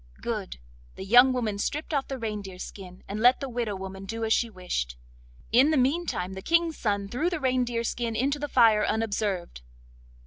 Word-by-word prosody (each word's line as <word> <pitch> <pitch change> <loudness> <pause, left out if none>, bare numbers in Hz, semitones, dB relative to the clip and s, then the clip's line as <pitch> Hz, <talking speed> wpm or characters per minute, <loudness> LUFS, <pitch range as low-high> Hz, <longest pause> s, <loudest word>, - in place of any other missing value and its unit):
Good; 65 -1 -4 0.4
the 190 - -7
young 245 +5 +7
woman 225 -5 -2
stript 300 +8 -3
off 275 -2 0
the 270 - -4
reindeer 210 -5 -5
skin, 185 -1 -9
and 205 +2 -4
let 245 +3 +5
the 275 - -4
widow 235 -4 -3
woman 190 0 -7
do 225 +3 -3
as 220 - +3
she 235 - +1
wished. 175 - -4 0.5
In 255 +6 +6
the 315 - +2
meantime 260 - 0
the 190 - -7
King's 335 - +1
son 200 -2 -1
threw 280 - -1
the 355 -3 -3
reindeer 250 -3 0
skin 235 -1 -2
into 275 +5 0
the 295 0 -4
fire 225 -5 +5
unobserved. 205 - -2
225 Hz, 185 wpm, -27 LUFS, 195-260 Hz, 0.5 s, young